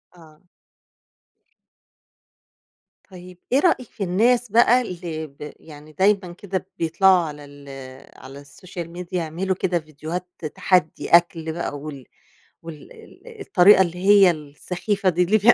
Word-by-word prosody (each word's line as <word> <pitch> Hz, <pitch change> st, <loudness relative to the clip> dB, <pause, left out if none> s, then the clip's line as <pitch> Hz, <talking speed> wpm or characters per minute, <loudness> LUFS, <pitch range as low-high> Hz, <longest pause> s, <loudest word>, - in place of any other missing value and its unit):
آه. 160 Hz, -1 st, -19 dB, 2.7 s
طيب، 180 Hz, -1 st, -12 dB
إيه 265 Hz, -, +4 dB
رأيك 285 Hz, -, +1 dB
في 205 Hz, -, -6 dB
الناس 230 Hz, +6 st, +1 dB
بقى 235 Hz, +2 st, +5 dB
اللي 170 Hz, -7 st, -6 dB
ب 150 Hz, +1 st, -11 dB
يعني 150 Hz, -1 st, -14 dB
دايمًا 195 Hz, -2 st, +2 dB
كده 190 Hz, -1 st, -5 dB
بيطلعوا 175 Hz, +2 st, +3 dB
على 150 Hz, -1 st, -9 dB
ال 145 Hz, 0 st, -15 dB, 0.5 s
على 140 Hz, +2 st, -12 dB
الSocial 170 Hz, +4 st, -9 dB
Media 180 Hz, -1 st, -7 dB
يعملوا 180 Hz, +2 st, -2 dB
كده 180 Hz, -1 st, -1 dB
فيديوهات 155 Hz, +3 st, -7 dB, 0.3 s
تحدّي 180 Hz, -5 st, 0 dB
أكل 165 Hz, -2 st, +3 dB
بقى، 165 Hz, -3 st, -4 dB
وال 140 Hz, -3 st, -9 dB, 0.6 s
وال 160 Hz, -3 st, -11 dB
ال 465 Hz, -4 st, -15 dB
الطريقة 195 Hz, -, +5 dB
اللي 175 Hz, -1 st, -6 dB
هي 200 Hz, -2 st, +7 dB
السخيفة 180 Hz, +6 st, -3 dB
دي 180 Hz, 0 st, +1 dB
اللي 200 Hz, +5 st, +2 dB
بي 225 Hz, +3 st, +6 dB
180 Hz, 130 wpm, -22 LUFS, 155-195 Hz, 2.7 s, هي